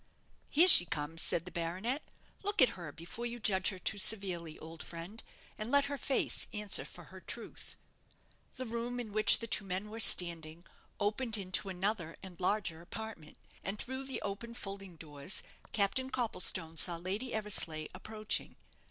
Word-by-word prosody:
"Here 330 +5 +7
she 245 - +11
comes!" 160 +1 -2
said 170 - +2
the 180 - -8
baronet; 185 - -2 0.4
"look 410 +1 -2
at 255 - +8
her 170 -5 -7
before 175 +10 -6
you 240 0 -6
judge 190 -4 +2
her 190 - -5
too 200 +3 0
severely, 185 -6 -1
old 160 0 -9
friend, 175 +7 -7 0.4
and 215 +2 -4
let 285 +1 +4
her 285 0 -3
face 270 - 0
answer 210 -1 +3
for - - -11
her - - -10
truth." - - -7 0.8
The 255 - -5
room 235 +1 -3
in 225 -3 -5
which 215 +1 +7
the 230 - -5
two 215 - +2
men 195 +2 -4
were 225 - -6
standing 170 -4 +3 0.3
opened 220 +3 +2
into 190 0 0
another 185 -2 -2
and 185 -3 -9
larger 185 -3 -1
apartment, 175 -4 -8 0.3
and 195 +2 -4
through 260 +4 -3
the 265 - -4
open 220 +4 -5
folding 195 -4 -6
doors 150 +2 -3 0.3
Captain 215 +6 +1
Copplestone 185 -9 -1
saw 175 +1 +3
Lady 195 +9 -3
Eversleigh 175 -7 +2
approaching. 215 +3 -3
200 Hz, 165 wpm, -33 LUFS, 170-225 Hz, 0.8 s, she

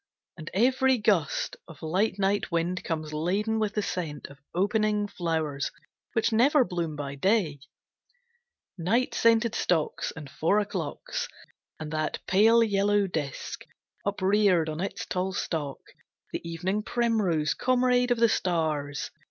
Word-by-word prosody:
And 155 -2 -8
every 260 +4 +3
gust 200 -9 +1
Of 160 -3 -13
light 185 +6 +1
night 200 0 0
wind 170 +2 -1
comes 155 -2 -3
laden 200 +8 0
with 215 -1 -1
the 210 - +1
scent 160 -7 -4
Of 140 - -15 0.2
opening 210 +2 +1
flowers 160 -7 -2 0.4
which 225 0 +1
never 255 +4 +4
bloom 170 -5 -3
by 140 -1 -5
day: 165 -1 +1 1.2
Night 230 +10 +1
scented 230 0 +3
stocks, 165 -8 0
and 160 -3 -8
four 165 +8 +1
o'clocks, - - -3 0.5
and 155 -1 -6
that 155 -1 -1
Pale 225 +5 +5
yellow 205 -1 +2
disk, 150 -7 -4 0.4
upreared 195 -4 +2
on 155 +2 -4
its 195 - -3
tall 185 +1 -2
stalk, 150 -6 -3 0.5
The - - -2
evening 175 +5 -2
primrose, 210 -10 +1
comrade 250 0 +2
of 245 - +2
the 230 0 +5
stars. 155 -8 -1
190 Hz, 135 wpm, -27 LUFS, 160-220 Hz, 1.2 s, Pale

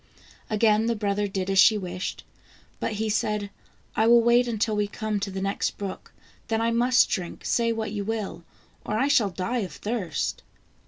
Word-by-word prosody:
Again 215 0 +3
the 235 - +1
brother 205 -1 0
did 190 -1 -3
as 195 - +3
she 215 +1 +7
wished, 185 -2 -5 0.6
but - - -2
he 220 +1 -2
said: 210 -1 -1 0.2
" - - -35
I 220 - +3
will 235 0 +6
wait 240 +1 +4
until 220 -1 0
we 210 0 +1
come 215 0 -3
to 200 - -3
the 190 0 -4
next 195 +1 -1
brook, 200 -2 -6 0.4
then 225 -1 0
I 230 +1 +1
must 245 +2 +4
drink, 180 -4 -4
say 230 -1 +2
what 220 -2 -3
you 205 -1 -3
will, 210 -5 -4 0.4
or 215 - -2
I 265 +5 +2
shall 250 -8 +3
die 195 +7 -2
of 185 -8 -4
thirst." 200 -6 -3
210 Hz, 195 wpm, -26 LUFS, 200-230 Hz, 0.6 s, she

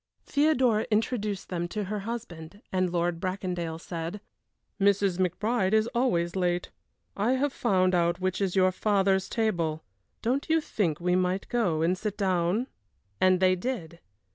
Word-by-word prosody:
Theodora 260 -7 +2
introduced 215 -2 -1
them 175 -1 -2
to 210 +4 -3
her 205 +2 -3
husband, 200 -4 -7
and 185 -1 +2
Lord 175 -1 0
Bracondale 180 -3 -3
said: 170 +3 -5 0.6
"Mrs. 195 -2 +2
McBride 190 +3 +1
is 220 0 +4
always 185 -9 +1
late. 180 -1 0 0.4
I 215 +5 +1
have 270 +1 0
found 185 -5 +2
out 170 0 +2
which 185 +1 -1
is 195 -2 0
your 185 -1 +4
father's 195 -1 +1
table; 170 -9 -1 0.4
don't 260 +7 0
you 325 0 +4
think 185 - -1
we 180 +1 +1
might 185 +1 0
go 180 -10 +1
and 175 +3 +2
sit 205 +2 -4
down?" 190 +3 +1 0.5
And 185 -1 +4
they 185 0 +4
did. 175 -6 -4
190 Hz, 150 wpm, -28 LUFS, 175-215 Hz, 0.6 s, is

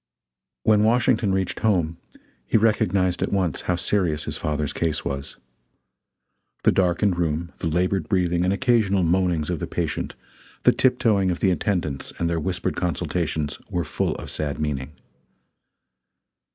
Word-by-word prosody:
When 105 -1 +4
Washington 115 -2 +3
reached 95 -1 -1
home, 85 -7 +1 0.5
he - - +3
recognized 100 -5 +2
at - - 0
once 95 -6 0
how 90 - 0
serious 85 -4 0
his - - -4
father's 75 -1 -2
case 80 -1 -1
was. 70 0 -4 1.3
The - - +5
darkened 90 0 +2
room, 85 0 -1
the 85 - -2
labored 90 0 0
breathing 90 -2 +1
and 90 - +2
occasional 100 -3 +2
moanings 85 -2 +1
of 85 - -2
the - - -3
patient, - - -3 0.5
the - - +7
tip 125 -1 +2
toeing 105 -7 +2
of 90 - -1
the 95 - +3
attendants 85 -8 -2
and 85 - 0
their 85 0 0
whispered 90 +2 -2
consultations, 75 -3 -2
were 90 -4 -1
full - - -1
of - - -7
sad 75 -2 -3
meaning. 75 -1 -3
90 Hz, 150 wpm, -24 LUFS, 80-100 Hz, 1.3 s, the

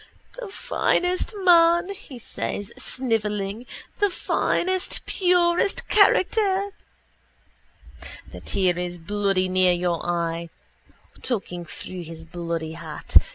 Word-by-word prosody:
—The - - -5
finest 390 -3 0
man, 345 0 +5 0.2
says 205 -3 -4
he, - - -15
snivelling, 215 -3 -2 0.3
the 410 - +3
finest 370 0 0
purest 355 0 +2
character. 400 -1 +3 1.6
The - - -8
tear 180 -2 +1
is 175 0 -4
bloody 195 +1 0
near 185 -1 +3
your 175 -1 -1
eye. 170 -1 -2 0.7
Talking 180 -7 -3
through 180 +2 -8
his 165 -1 -9
bloody 165 -1 -4
hat. 165 -2 -1
205 Hz, 100 wpm, -24 LUFS, -, 1.6 s, man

